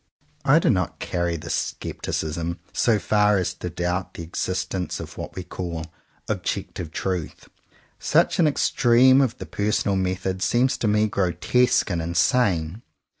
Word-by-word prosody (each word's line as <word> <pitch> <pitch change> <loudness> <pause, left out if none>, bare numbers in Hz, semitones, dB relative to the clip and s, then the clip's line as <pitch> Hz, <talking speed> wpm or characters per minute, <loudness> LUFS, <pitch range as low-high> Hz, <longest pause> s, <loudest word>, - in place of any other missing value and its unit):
I - - +5
do - - +3
not - - -1
carry 85 -1 -2
my 80 +2 -10
scepticism 85 +1 -3 0.2
so 115 -3 +3
far 105 0 +3
as 90 -1 -1
to 90 - -6
doubt 90 +2 -3
the 85 - -6
existence 90 +2 -3
of - - -8
what - - -7
we 90 - -5
call 85 -3 -5 0.4
*'ob - - -2
jective 85 -4 -4
truth." 90 -2 -4 0.5
Such - - +2
an 165 - +5
extreme 130 -2 +4
of 125 -3 0
the - - -7
personal 100 -1 0
method 95 0 -2
seems 130 +5 +2
to 115 - -1
me 105 +1 +3
grotesque 100 +5 +1
and 85 -2 -1
insane. 85 +1 +1
95 Hz, 150 wpm, -24 LUFS, 85-105 Hz, 0.5 s, I